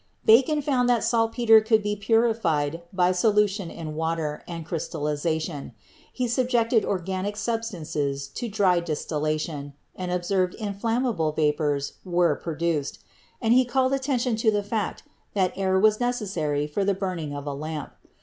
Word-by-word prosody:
Bacon 270 +7 +5
found 255 -3 +2
that 240 -3 +3
saltpeter 225 -1 +4
could 220 -1 +2
be 210 0 -1
purified 200 -8 +1
by 180 -1 +3
solution 205 -1 +2
in 160 -2 -7
water 160 -1 -2
and 165 -2 -6
crystallization; 155 -2 -3 0.4
he 250 -1 -2
subjected 235 -2 +2
organic 190 +2 -2
sub 225 +1 -1
stances 150 -9 -3
to 235 - -5
dry 195 -4 +3
distillation 155 -2 -3 0.2
and 180 -1 -4
observed 180 +1 0
that - - -13
inflammable 210 -5 0
vapors 150 -2 0
were 175 -2 +2
produced; 165 -3 -2 0.5
and 225 +1 +4
he 255 +1 +6
called 260 +1 +1
attention 265 -3 0
to 225 0 +3
the 205 -1 +1
fact 205 -1 -3 0.3
that 185 -2 +2
air 190 -1 +1
was 215 +1 +4
necessary 190 -12 -1
for 150 +7 -2
the 200 0 +1
burning 180 -7 -3
of 145 0 -6
a 145 - -3
lamp. 150 +1 -5
190 Hz, 150 wpm, -25 LUFS, 155-225 Hz, 0.5 s, he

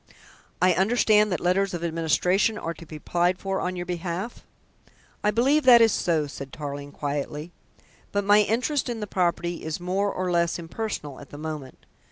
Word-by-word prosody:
I 185 +1 +4
understand 210 +1 +3
that 180 - 0
letters 185 +2 +1
of 170 - -5
administration 170 +6 +1
are 165 -4 -4
to 165 +1 -13
be 155 - -9
applied 175 +4 0
for 195 0 -2
on 185 0 -2
your 175 0 -4
behalf?" 180 +5 -4 0.8
"I 210 - +3
believe 260 +8 +3
that 245 -2 +9
is 225 -1 +5
so," 165 -5 +1
said 140 -1 -8
Tarling 145 -1 -6
quietly. 145 +3 -4 0.6
"But 205 0 0
my 205 +1 +6
interest 250 +7 0
in 235 -2 -3
the 210 - -3
property 175 -2 -1
is 160 +1 -3
more 190 +3 0
or 185 -1 -2
less 170 -1 +1
impersonal 165 -5 -5
at 145 - -12
the 145 - -10
moment. 150 -4 -7
180 Hz, 180 wpm, -25 LUFS, 160-205 Hz, 0.8 s, that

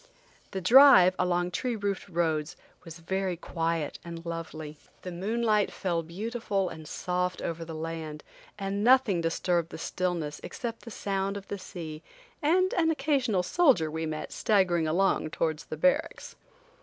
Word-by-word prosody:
The 190 - -4
drive, 230 -4 +8
along 175 0 +1
tree 240 +6 -1
roofed 200 -2 -3
roads, 165 -1 -1 0.3
was 165 -1 -10
very 185 +1 -2
quiet 165 -3 -2
and 170 -1 -8
lovely. 160 -2 -6 0.2
The 180 - -5
moonlight 210 +3 +1
fell 170 -3 -1
beautiful 200 +2 -2
and 160 -1 -9
soft 180 +1 -2
over 165 0 -4
the 165 -1 -7
land, 160 -1 -5 0.3
and 200 0 -2
nothing 245 -7 +4
disturbed 170 0 0
the - - -8
stillness 165 -3 -3
except 235 -1 -6
the - - -7
sound 195 -2 -2
of 200 - -10
the 200 - -4
sea 160 -4 -7 0.4
and 365 +5 +3
an 325 -2 +2
occasional 270 - +1
soldier 210 - +3
we 160 +1 -3
met 155 0 -5
staggering 180 -6 +2
along 175 0 +1
towards 155 0 -2
the 155 - -6
barracks. 275 - 0
180 Hz, 150 wpm, -28 LUFS, 165-205 Hz, 0.4 s, drive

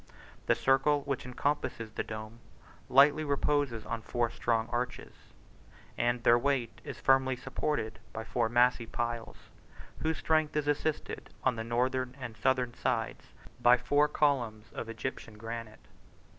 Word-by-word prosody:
The - - +5
circle 140 +2 +3
which 135 -3 -3
encompasses 125 -3 -2
the - - -3
dome, 110 +1 -7 0.5
lightly 145 +4 +6
reposes 140 -5 0
on 115 -1 -3
four 120 +1 -1
strong 115 -1 0
arches, 125 +1 -3 0.8
and 120 0 0
their 120 0 +6
weight 130 -3 -1
is - - -7
firmly 135 -1 +3
supported 125 -3 -3
by 110 - -5
four 115 0 0
massy 120 0 +3
piles, 120 -2 -3 0.6
whose 160 0 0
strength 155 -1 +1
is 150 -1 0
assisted, 145 +1 -1
on 130 -2 +2
the 115 - -3
northern 125 +2 0
and 120 -4 -6
southern 125 0 +1
sides, - - -2 0.3
by 120 +1 +7
four 145 +4 +3
columns 120 -8 0
of 115 - -5
Egyptian 115 -1 -5
granite. 115 0 -7
125 Hz, 140 wpm, -31 LUFS, 115-140 Hz, 0.8 s, by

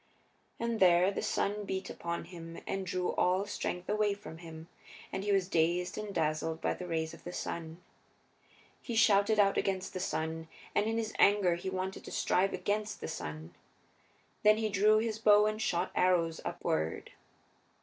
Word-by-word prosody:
And 235 -1 -1
there 180 +1 +5
the - - -3
sun 210 -1 -1
beat 190 -1 -3
upon 170 0 -4
him, 165 -1 -9
and 195 -1 -3
drew 180 0 -1
all 185 +2 +2
strength 180 -3 -4
away 210 -1 +1
from 200 -5 -10
him, 165 -1 -10 0.5
and 190 - -2
he 205 - 0
was 195 -2 +2
dazed 175 +1 +1
and 210 -1 -5
dazzled 160 -1 -1
by - - 0
the 180 - -7
rays 160 -1 -2
of - - -13
the 175 - -6
sun. 165 -1 -5 1.0
He 235 - -5
shouted 210 -1 +4
out 195 -1 +4
against 190 -1 -2
the 185 - -3
sun, 160 -2 -3 0.3
and 205 +1 +2
in 225 0 0
his 220 -1 -2
anger 200 -3 +5
he 175 +2 -4
wanted 190 0 -4
to - - -8
strive 195 +2 +2
against 210 +4 -2
the - - -5
sun. 80 - -6 0.9
Then 215 0 +6
he 220 -1 0
drew 210 +2 +4
his 220 0 -1
bow 210 -1 +6
and 215 +1 -1
shot 175 -5 0
arrows 170 -3 +2
upward. 80 +1 -2
190 Hz, 175 wpm, -32 LUFS, 170-210 Hz, 1.0 s, Then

